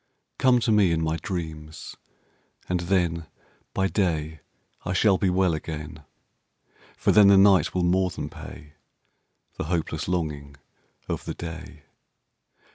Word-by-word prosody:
]COME 125 -2 +4
to 115 - +1
me 105 -5 +4
in 85 - +1
my 80 0 0
dreams, 80 -3 -6 0.7
and 90 0 0
thenBy 85 +1 -2
day 80 -5 -1 0.4
I - - -2
shall 95 +1 +3
be 95 - +2
well 90 -1 +2
again. 75 -1 -6 0.9
For - - +2
then 105 -2 +7
the 100 0 +7
night 95 -5 +5
will 90 - +1
more 90 +1 +2
than 90 - -5
payThe 75 0 -11 0.9
hopeless 80 -2 -2
longing 75 -6 -3 0.5
of - - -4
the - - -5
day. 85 -2 -8
85 Hz, 125 wpm, -25 LUFS, 80-95 Hz, 0.9 s, then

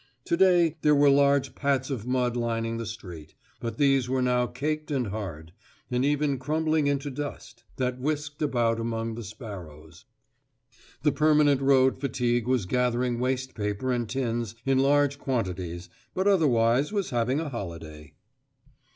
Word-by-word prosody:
To - - +1
day 175 -3 +4
there 150 -1 +4
were 145 0 +5
large 140 -1 +3
pats 140 -1 0
of 120 -3 -4
mud 125 -1 0
lining 115 -1 -1
the 115 -1 -4
street, 90 -8 -9 0.2
but 115 -1 -5
these 135 -3 +3
were 130 0 +1
now 125 -1 +2
caked 155 +4 -3
and 135 -4 0
hard, 85 -6 -6 0.4
and 125 +1 +1
even 145 -1 +1
crumbling 155 +2 0
into 140 0 -1
dust, 130 -4 -7
that 125 -1 -2
whisked 150 +2 -3
about 120 -6 +1
among 115 0 -2
the 115 +1 -6
sparrows. 90 -7 -10 1.0
The 150 - +4
permanent 150 -3 +3
road 130 -1 +4
fatigue 120 -3 0
was 125 -6 +1
gathering 125 +2 0
waste 130 +1 -1
paper 105 +4 -2
and 120 -3 -1
tins 120 -3 -2
in 135 -1 +3
large 140 +1 +3
quantities, 90 -9 -3 0.3
but 190 +2 +1
otherwise 135 - +3
was 200 -4 -2
having 125 +3 +1
a 160 -2 -3
holiday. 80 - -8
125 Hz, 150 wpm, -27 LUFS, 115-140 Hz, 1.0 s, were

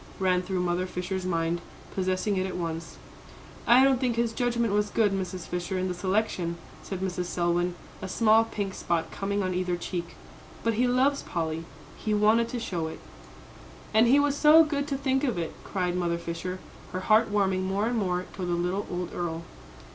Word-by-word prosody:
ran 185 -1 +2
through 185 0 -2
Mother 180 +1 0
Fisher's 185 +1 -3
mind, 165 -1 0 0.3
possessing 185 +2 0
it 185 0 0
at 185 - -5
once. 165 -1 -4 0.7
"I 250 +2 +7
don't 270 -1 +4
think 245 -3 +1
his 230 -1 0
judgment 235 -3 0
was 210 0 +2
good, 210 -2 +2
Mrs. 185 -2 -3
Fisher, 180 +1 -3
in 185 0 0
the - - -1
selection," 185 -2 -1 0.2
said 190 -2 -5
Mrs. 180 -1 -2
Selwyn, 175 0 0 0.3
a 190 - -5
small 225 +2 +4
pink 200 -3 -3
spot 170 -3 -1
coming 200 0 -1
on 185 0 -1
either 180 0 0
cheek; 170 -1 -5 0.5
"but 230 - +2
he 245 +3 +2
loves 265 +3 +2
Polly, 165 -1 -3 0.4
and 210 -1 +1
wanted 225 +2 +4
to 245 - -3
show 175 -8 -2
it." 160 - -7 0.9
"And 220 +2 +6
he 270 +4 +6
was 285 -1 +2
so 305 +2 +7
good 290 -2 -1
to 280 -2 -1
think 265 0 0
of 245 -9 0
it," 165 -2 -3
cried 180 -2 -1
Mother 170 -1 0
Fisher, 170 +2 -4 0.4
her 185 - -2
heart 215 +3 +4
warming 195 -2 +1
more 195 +3 0
and 240 +2 0
more 180 -2 -1
toward 180 -2 -4
the - - +1
little 180 +4 -1
old 180 -1 -4
earl. 170 -1 -3
190 Hz, 195 wpm, -27 LUFS, 175-225 Hz, 0.9 s, I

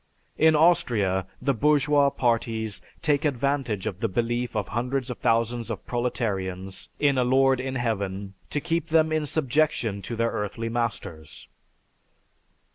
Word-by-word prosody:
In 160 0 +5
Austria 120 - +2
the 140 - +1
bourgeois 145 +2 +3
parties 115 -4 0 0.2
take 145 -1 +2
advantage 135 -7 -1
of 95 - -4
the 115 - 0
belief 120 +4 -1
of 105 - -2
hundreds 125 +3 -2
of 125 - -7
thousands 115 0 +1
of 110 -5 -5
proletarians 95 -6 -3
in 140 -3 +3
a - - +3
Lord 130 +1 +3
in 130 +1 -3
Heaven 100 -5 -2 0.2
to 145 - -1
keep 165 +2 -1
them 160 0 +3
in 155 -1 0
subjection 140 -8 0
to 115 - -5
their 115 0 0
earthly 110 +3 -3
masters." 115 -9 -4
120 Hz, 140 wpm, -25 LUFS, 110-140 Hz, 0.2 s, In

